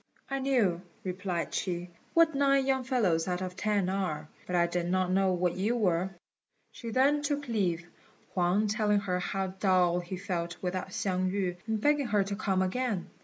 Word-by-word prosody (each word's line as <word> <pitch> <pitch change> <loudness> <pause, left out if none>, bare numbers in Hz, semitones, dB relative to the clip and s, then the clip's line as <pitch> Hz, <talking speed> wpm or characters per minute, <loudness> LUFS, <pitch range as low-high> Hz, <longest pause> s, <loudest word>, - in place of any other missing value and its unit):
"I 275 - 0
knew," 235 -11 +2 0.2
replied 180 -3 -3
she, 175 -1 -2 0.2
"what 330 -1 +5
nine 275 -1 +3
young 265 -1 +1
fellows 205 -11 +1
out 180 -1 -1
of 180 -1 -5
ten 205 -3 +1
are; 185 -6 -2 0.2
but 180 - -2
I 170 -1 +4
did 175 0 -2
not 185 0 +1
know 190 0 +3
what 180 -1 0
you 205 +6 0
were." 185 -5 +1 0.6
She 230 - -7
then 275 +5 +3
took 290 -1 -2
leave, 180 -7 0 0.5
Huang 185 +3 +2
telling 210 -1 +2
her 180 -3 -1
how 190 +2 -2
dull 180 -3 +3
he 180 +1 -5
felt 175 -2 -3
without 185 0 -3
Hsiang 185 -1 0
yü, 185 -3 -1
and 220 -1 0
begging 290 +2 +2
her 205 -3 +3
to 200 +1 -3
come 190 -2 +1
again. 210 0 -2
190 Hz, 180 wpm, -30 LUFS, 180-225 Hz, 0.6 s, what